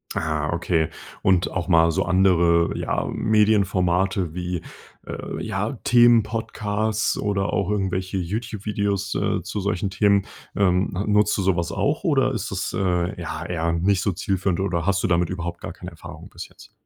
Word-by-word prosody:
Ah, 80 -1 -1
okay 85 -2 0 0.3
und 95 -2 +2
auch 90 -3 -3
mal 85 -2 +5
so - - 0
andere, 85 -3 +3
ja, - - -1
Medienformate 95 -4 +2
wie, 90 -1 -4 0.4
äh, - - -6
ja - - -2
Themen 120 -2 +6
Podcasts 110 -1 -1
oder 100 -1 -1
auch 100 -3 0
irgendwelche 95 -2 -1
Youtube-Videos, 100 0 -2
äh, - - -1
zu 90 +4 -4
solchen 100 -1 -1
Themen. 100 0 +3 0.3
Ähm, 95 -1 +2 0.2
nutzt 105 0 +3
du 100 - 0
sowas 85 -3 0
auch 140 - -1
oder 145 -7 +2
ist 105 -3 -3
das, 95 -1 -3
äh, 90 0 -1
ja, 80 0 -5
eher 85 -1 -1
nicht 90 +3 +1
so 100 - +1
zielführend 95 0 -1
oder 90 -3 -1
hast 100 0 +1
du - - +2
damit 85 -2 +1
überhaupt 85 -2 -5
gar 85 - -6
keine 90 0 -9
Erfahrung 80 - -11
bis - - -9
jetzt? - - -17
95 Hz, 165 wpm, -23 LUFS, 85-105 Hz, 0.4 s, Themen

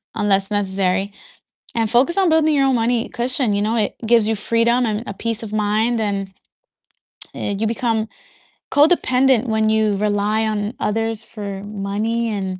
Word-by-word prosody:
unless 195 0 +1
necessary, 195 -1 0 0.6
and 225 -2 0
focus 265 +10 +2
on 375 -3 +3
building 315 -1 +3
your 275 -1 +3
own 265 - +2
money 230 0 0
cushion." 245 -2 -1
You 200 - 0
know, 220 +2 0
it 210 - -1
gives 230 -2 +4
you 220 - +1
freedom, 235 +3 +1
and 215 +1 -2
a 200 - -4
peace 230 +2 -3
of 210 - -7
mind, 215 +3 +1
and, 195 -2 -3 1.0
uh, 205 - -3
you 220 - +1
become 225 -1 -1 0.6
codependent 265 -5 +3
when 220 -1 +1
you 215 -2 +2
rely 210 +1 0
on 210 +1 -2
others 225 +1 -1
for 200 -3 -7
money 210 +3 -2
and 190 -2 -4
220 Hz, 160 wpm, -20 LUFS, 205-235 Hz, 1.0 s, gives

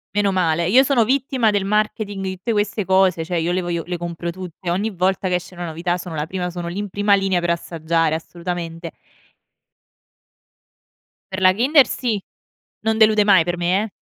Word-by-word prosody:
Meno 205 -1 +2
male, 170 -2 +1
io 255 +7 +6
sono 270 -4 +3
vittima 255 -2 +1
del 200 -2 0
marketing 210 -1 -1
di 190 0 -3
tutte 225 +6 -2
queste 210 -1 -1
cose. 190 -3 +2
Cioè, 175 +1 -2
io 165 +1 0
le 185 +1 0
voglio 170 -2 -3
le 175 0 -4
compro 170 0 -5
tutte, 180 0 -7
ogni 200 +5 0
volta 190 -1 0
che 180 - +1
esce 180 +1 -5
una 175 0 -5
novità 170 +2 -2
sono 175 -2 -7
la 150 -1 -2
prima, 180 +1 -4
sono 175 -1 -5
lì 175 - -6
in 205 0 -3
prima 205 +1 +2
linea 195 -2 0
per 175 - -1
assaggiare, 165 -1 0
assolutamente. 170 0 -6 2.4
Per 190 - -4
la 185 0 +6
Kinder 265 +7 +4
sì. 230 -5 -2 0.6
Non 220 0 +1
delude 215 -1 +5
mai 195 -5 +5
per 175 +1 -3
me, 180 +4 +1
eh. 220 - -5
185 Hz, 190 wpm, -20 LUFS, 170-205 Hz, 2.4 s, io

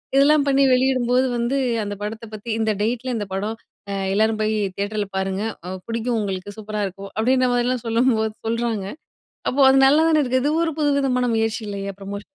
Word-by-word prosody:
இதெல்லாம் 285 +1 +5
பண்ணி 275 0 +4
வெளியிடும்போது 255 0 +2
வந்து 235 +4 0 0.3
அந்த 205 0 -4
படத்த 220 +2 -5
பத்தி 215 +2 -8
"இந்த 220 -1 +1
டேட்ல, 240 +3 -1
இந்த 205 - -3
படம் 210 +3 -2 0.4
அ - - -2 0.2
எல்லாரும் 215 +1 +2
போயி 215 0 +1 0.2
தியேட்டர்ல 205 +1 -2
பாருங்க. 190 +1 -1 0.2
அ - - -4 0.2
பிடிக்கும் 230 +1 -1
உங்களுக்கு. 195 0 -4
சூப்பரா 215 -1 -4
இருக்கும்." 195 +1 -9
அப்பிடின்றமாரிலாம் 250 +1 +1
சொல்லும்போது 225 -2 +2
சொல்றாங்க. 230 -3 -1 0.6
அப்போ, 275 - 0
அது 265 - +5
நல்லாதான 310 +3 +4
இருக்கு. 255 -1 +1
இது 290 - +1
ஒரு 325 - +1
புதுவிதமான 275 -4 +1
முயற்சி 225 +1 0
இல்லயா! 200 -1 -4
ப்ரமோஷன். 200 +1 -6
225 Hz, 165 wpm, -22 LUFS, 210-255 Hz, 0.6 s, இதெல்லாம்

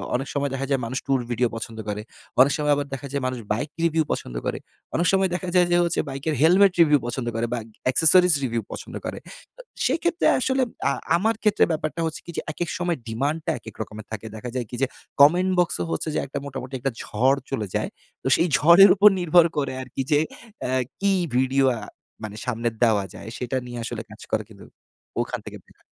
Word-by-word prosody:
অনেক 135 +3 -2
সময় 140 0 0
দেখা 135 0 -2
যায় 135 -2 +1
মানুষ 130 +3 -3
টুর 135 -1 +2
ভিডিও 120 +1 +2
পছন্দ 115 0 -7
করে। 105 +1 -3 0.4
অনেক 140 +2 +6
সময় 150 -1 +2
আবার 145 0 -2
দেখা 135 +1 -5
যায় 140 - -1
মানুষ 130 -1 -3
বাইক 140 +7 -3
রিভিউ 165 -1 +2
পছন্দ - - -4
করে। - - -2 0.4
অনেক 170 +2 +2
সময় 190 -1 +3
দেখা 185 0 -4
যায় 180 -1 +5
যে 175 - +5
হচ্ছে, 170 - 0
বাইকের 140 +3 -3
হেলমেট 185 +5 +6
রিভিউ 150 -3 +5
পছন্দ 120 0 -3
করে 115 +1 0
বা 120 - -1 0.3
অ্যাক্সেসরিজ 165 +6 +5
রিভিউ 115 -2 -1
পছন্দ - - -8
করে। - - -5 0.4
তো - - -10 0.2
সেক্ষেত্রে 345 +2 +1
আসলে 260 +1 +1 0.3
আ - - +2 0.3
আমার 220 +5 +1
ক্ষেত্রে 210 - +4
ব্যাপারটা 155 +1 -2
হচ্ছে 160 - -4
কি? 170 - -7
যে, - - 0
একেক 170 +2 -3
সময় 175 -2 -1
ডিমান্ড 140 +8 -1
টা - - +1
একেক 110 -2 -11
রকমের 110 0 -7
থাকে। 110 +1 -6
দেখা 125 +3 -6
যায় 125 -2 -1
কি? 125 - -6
যে, 135 - +3 0.3
কমেন্ট 180 +6 +6
বক্স 175 -1 +2 0.2
হচ্ছে 80 - -2
যে - - +2 0.3
মোটামুটি 135 -1 -7
একটা 135 +2 -1
ঝড় 130 +6 +2
চলে 110 -6 -2
যায়। - - -1 0.3
তো - - -2
সেই 170 - +2
ঝড়ের 170 +7 +8
উপর 205 +1 +8
নির্ভর 175 -1 +5
করে 140 -2 -1
আরকি 130 +1 -5
যে, 145 - +5 0.4
অ্যা 130 +1 -1 0.2
কি 200 0 +2 0.3
ভিডিও 130 +1 +3
আ - - -6 0.4
মানে 105 -1 -6
সামনে 120 -1 -1 0.2
দেওয়া 105 -4 +3
যায়? 110 - -9
সেটা 125 +1 -2
নিয়ে 120 -1 -6
আসলে 115 -1 -4
কাজ 110 +1 -13
করে 110 -1 +1
কিন্তু 100 -3 -14 0.6
ওখান - - -3
থেকে - - -8
দেয়া - - -25
140 Hz, 210 wpm, -24 LUFS, 120-170 Hz, 0.6 s, ঝড়ের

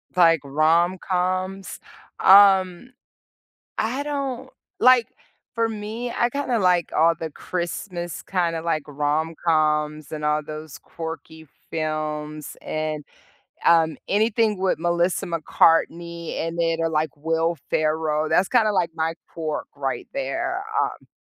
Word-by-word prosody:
Like 165 -3 +5
rom-coms? 180 +5 0 0.4
Um, 195 +3 +5 0.8
I 255 +6 -1
don't 270 -3 -3 0.3
like, 250 -2 +6 0.5
for 230 -1 +1
me, 220 +3 -5
I 240 - +1
kinda 255 -3 -1
like 180 -3 +2
all 165 +2 +4
the 160 - -4
Christmas 175 +1 -5
kinda 170 -3 -1
like 160 -2 -1
rom-coms 150 0 0
and 155 -1 -5
all 150 0 +2
those 155 0 -8
quirky 160 -1 -8 0.2
films 155 -1 -4
and, 155 -1 -3 0.6
um, 165 -2 +4
anything 215 0 +2
with 190 -2 0
Melissa 175 +1 +1
McCartney 170 0 +1
in 165 +1 -3
it 165 -1 +1
or 165 0 +1
like 155 -1 0
Will 165 +2 0
Ferrell, 155 0 0
that's 185 - +3
kinda 225 -4 +3
like 180 -4 +1
my 160 +1 -1
pork 155 -2 -4
right 135 -2 -3
there, 345 +7 -2 0.2
um - - -6
170 Hz, 120 wpm, -23 LUFS, 155-195 Hz, 0.8 s, like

